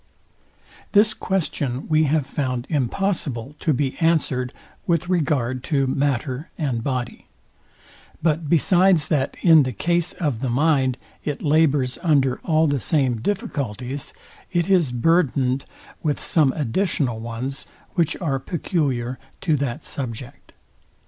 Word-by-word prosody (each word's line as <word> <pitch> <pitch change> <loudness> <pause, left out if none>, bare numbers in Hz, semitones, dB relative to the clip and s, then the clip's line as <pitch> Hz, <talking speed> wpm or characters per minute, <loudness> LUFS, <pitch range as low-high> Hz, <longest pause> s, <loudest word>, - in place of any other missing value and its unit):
This 215 +1 +5
question 145 - -2
we 155 0 +3
have 150 -1 +1
found 130 -3 -2
impossible 145 - -1
to 160 - +1
be 135 -1 0
answered 150 -7 +1 0.4
with 170 0 +1
regard 140 -8 0
to 140 -4 +1
matter 135 +1 -1
and 130 -8 -1
body: 125 -2 -3 0.9
But 160 -1 0
besides 175 0 +4
that 140 -3 0
in 165 -3 +8
the 130 -2 0
case 170 - 0
of 145 -9 -2
the 130 0 -2
mind, 135 -1 +2 0.3
it 150 -2 -4
labours 145 -4 +2
under 140 -7 +2
all 160 -1 +2
the 145 -3 +1
same 130 -6 +1
difficulties, 140 - -3 0.4
it 175 +1 0
is 170 -9 +3
burthened 130 -1 +2 0.4
with 150 -2 0
some 150 -5 +3
additional 140 - -1
ones, 120 +4 -5 0.3
which 170 -4 0
are 140 -7 -1
peculiar 130 -6 -2 0.2
to 160 -5 +2
that 140 +2 -3
subject. 120 -2 -6
145 Hz, 125 wpm, -22 LUFS, 130-165 Hz, 0.9 s, in